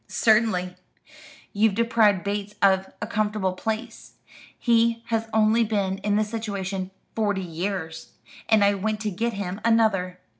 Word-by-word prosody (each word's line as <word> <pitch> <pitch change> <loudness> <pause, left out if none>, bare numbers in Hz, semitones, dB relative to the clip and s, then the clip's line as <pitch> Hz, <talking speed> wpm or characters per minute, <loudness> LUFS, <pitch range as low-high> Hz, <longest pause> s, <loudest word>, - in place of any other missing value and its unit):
"Certainly. 215 -5 +2 0.8
You 215 +2 +3
deprived 220 -3 +2
Bates 205 0 -3
of 190 -1 +3
a - - -1
comfortable 210 -3 -1
place 220 +4 -5 0.4
he 230 -1 +2
has 225 -1 -1
only 220 +1 +3
been 200 -3 -1
in 205 -1 0
the 215 - +3
situation 200 -4 -4 0.3
forty 205 -3 0
years 170 -1 -5 0.4
and 220 -2 +5
I 200 0 +4
went 210 +2 -2
to 215 -1 -2
get 230 +5 -2
him 195 0 -5
another. 215 -6 +2
210 Hz, 140 wpm, -24 LUFS, 190-225 Hz, 0.8 s, and